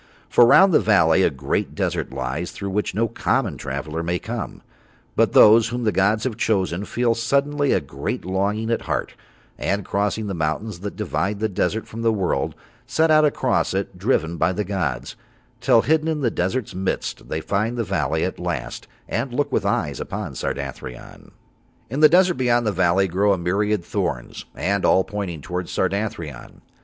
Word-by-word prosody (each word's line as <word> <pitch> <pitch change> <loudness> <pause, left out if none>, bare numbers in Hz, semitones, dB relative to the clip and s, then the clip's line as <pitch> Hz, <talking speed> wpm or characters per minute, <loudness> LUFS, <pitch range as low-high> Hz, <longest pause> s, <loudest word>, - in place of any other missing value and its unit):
For 120 - +6
round 190 +7 +7
the - - +6
valley 95 -5 +4
a - - +4
great 70 -4 -2
desert - - -2
lies 65 +6 -3
through 100 -1 -5
which 105 -1 -1
no 115 +2 +2
common 115 - 0
traveller 70 +4 -4
may 85 +1 -1
come, 115 +4 -6 0.5
but - - +2
those 110 +1 +7
whom 120 +1 -3
the 110 - +2
gods 105 +3 +2
have 120 -5 -2
chosen 95 -4 0
feel 120 +1 +1
suddenly 140 +5 +1
a - - +3
great - - -5
longing 100 +4 -1
at 115 - 0
heart, - - -2 0.5
and 100 0 -1
crossing 105 +2 -1
the 100 - -3
mountains 85 +5 -2
that 100 +2 -6
divide 100 +2 -2
the 110 - +1
desert 105 +2 -1
from 115 - -7
the 115 -1 +3
world, 100 -4 -1 0.3
set 160 +6 +2
out 155 0 +6
across 130 -8 +1
it 95 -1 -3
driven 85 -6 0
by 95 - +2
the 100 +3 -2
gods, 90 -10 -3 0.4
till 115 - +4
hidden 160 +1 +2
in 155 -2 -1
the 120 -4 +1
desert's 100 +7 -2
midst 95 +1 -3
they 80 - -2
find 105 +8 -1
the 115 - 0
valley - - -1
at - - -4
last - - -4 0.2
and 120 +3 -2
look 145 +4 -1
with - - 0
eyes - - -1
upon - - -5
Sardathrion. 60 -1 -6 0.6
In 135 - -2
the 155 0 +8
desert 180 0 +4
beyond 120 -2 +2
the 105 - +2
valley 95 +1 +2
grow 100 +3 +2
a - - 0
myriad 100 +2 0
thorns, - - -3
and 100 +1 -1
all 95 - +4
pointing 100 -7 -5
towards 90 +2 -4
Sardathrion. 95 - -3
105 Hz, 180 wpm, -22 LUFS, 90-115 Hz, 0.6 s, the